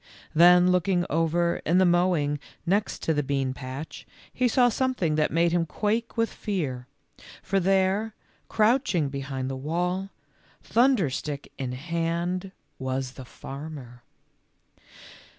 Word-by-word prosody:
Then 180 Hz, +2 st, +6 dB
looking 180 Hz, 0 st, +2 dB
over 165 Hz, +2 st, +1 dB
in 170 Hz, +3 st, +2 dB
the 185 Hz, -, +5 dB
mow 175 Hz, +1 st, +3 dB
ing 145 Hz, 0 st, -1 dB, 0.3 s
next 200 Hz, +4 st, 0 dB
to 160 Hz, -, +1 dB
the 145 Hz, -, +1 dB
bean 135 Hz, -2 st, -1 dB
patch 130 Hz, +4 st, -8 dB, 0.3 s
he 255 Hz, -, +2 dB
saw 245 Hz, +1 st, +4 dB
something 245 Hz, -9 st, 0 dB
that 150 Hz, 0 st, +2 dB
made 170 Hz, +1 st, +2 dB
him 170 Hz, -1 st, +1 dB
quake 225 Hz, +7 st, -2 dB
with 230 Hz, 0 st, +1 dB
fear, 140 Hz, -, -3 dB, 0.6 s
for 195 Hz, 0 st, +1 dB
there, 195 Hz, +3 st, +1 dB, 0.3 s
crouching 215 Hz, -, +2 dB
behind 135 Hz, -1 st, -4 dB
the 135 Hz, -, -3 dB
wall, 180 Hz, +7 st, -2 dB, 0.5 s
thunder 235 Hz, -, +3 dB
stick 145 Hz, +1 st, -5 dB
in 130 Hz, -2 st, -3 dB
hand, 170 Hz, +5 st, -2 dB, 0.3 s
was 130 Hz, 0 st, -2 dB
the 130 Hz, 0 st, -10 dB
farmer. 135 Hz, -3 st, -9 dB
170 Hz, 135 wpm, -26 LUFS, 140-190 Hz, 0.6 s, Then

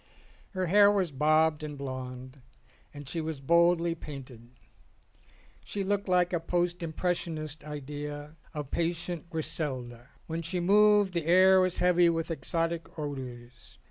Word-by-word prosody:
Her 185 Hz, -1 st, -1 dB
hair 200 Hz, +3 st, +6 dB
was 195 Hz, -5 st, +1 dB
bobbed 155 Hz, +2 st, +2 dB
and 150 Hz, -1 st, -6 dB
blonde, 130 Hz, -1 st, -7 dB, 0.5 s
and 145 Hz, -2 st, -10 dB
she 165 Hz, +4 st, -3 dB
was 155 Hz, -2 st, -4 dB
boldly 170 Hz, +3 st, +3 dB
painted. 135 Hz, -7 st, -10 dB, 1.1 s
She 200 Hz, -, -4 dB
looked 200 Hz, +1 st, -1 dB
like 180 Hz, 0 st, +2 dB
a 175 Hz, -, +1 dB
post 175 Hz, +1 st, -1 dB
impressionist's 160 Hz, -2 st, -3 dB
idea 145 Hz, +1 st, -7 dB, 0.2 s
of 150 Hz, -3 st, -6 dB
patient 170 Hz, 0 st, -2 dB
Griselda. 130 Hz, -7 st, -3 dB, 0.2 s
When 165 Hz, +1 st, -4 dB
she 175 Hz, +3 st, -3 dB
moved 205 Hz, +1 st, +4 dB
the 170 Hz, -2 st, -2 dB
air 185 Hz, +2 st, +6 dB
was 185 Hz, -1 st, 0 dB
heavy 180 Hz, -1 st, +4 dB
with 165 Hz, 0 st, -2 dB
exotic 165 Hz, +1 st, -2 dB
odours. 125 Hz, -5 st, -7 dB
165 Hz, 135 wpm, -29 LUFS, 145-175 Hz, 1.1 s, hair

